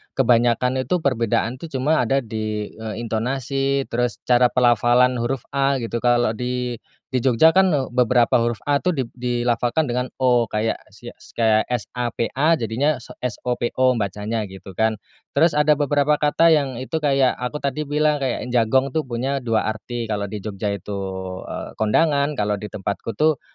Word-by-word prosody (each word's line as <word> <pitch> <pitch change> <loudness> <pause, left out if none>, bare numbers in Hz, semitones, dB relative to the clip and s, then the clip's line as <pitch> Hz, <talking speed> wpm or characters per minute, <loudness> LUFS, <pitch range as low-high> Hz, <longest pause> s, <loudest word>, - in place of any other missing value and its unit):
kebanyakan 125 0 +2
itu 180 -3 0
perbedaan, 120 -1 0
tuh, 165 - -7
cuma 150 +5 +2
ada 135 +3 +1
di, 110 -2 -4
eee, 110 +1 -6
intonasi, 135 +4 -1
terus 120 -1 0
cara 125 0 +4
pelafalan 120 +1 +3
huruf 120 +2 -2
A, 140 0 +1
gitu. 115 +1 -3
Kalo 120 -1 +2
di 125 +1 -3 0.3
di 130 - -1
Jogja, 130 +5 +5
kan, 185 +1 +3 0.2
beberapa 125 -1 +3
huruf 115 -2 -1
A, 145 - +4
tuh, 180 +5 0
di 140 - -1 0.2
dilafalkan 120 +3 0
dengan 125 +1 -2
O. 125 -2 +4
Kayak 110 0 -1 0.2
sia - - -10 0.2
kaya 110 -2 +2
S-A-P-A, 125 +5 -1
jadinya 130 +1 0
so 125 - -13
S-O-P-O, 125 +1 0
bacanya, 105 +2 -2
gitu, 95 -1 -12
kan. 110 0 +2 0.4
Terus 160 +2 +3
ada 150 0 +5
beberapa 145 0 +1
kata 160 +2 +4
yang 140 -5 0
itu 145 +6 -3
kayak, 135 -3 +3
aku 125 +4 -4
tadi 140 0 -2
bilang 150 0 +1
kayak 130 -3 -2
jagong, 130 +3 +2
tuh, 160 - +1
punya 135 +3 -2
2 115 -3 0
arti, 120 +2 -6
kalau 105 -2 -3
di 105 - -5
Jogja 105 0 -4
itu, 100 0 -4 0.5
eee, - - -6
kondangan, 140 +5 +2
kalau 105 -1 -1
di 105 - -6
tempatku 100 +2 -5
tuh, 155 -3 +2
125 Hz, 165 wpm, -22 LUFS, 115-140 Hz, 0.5 s, Jogja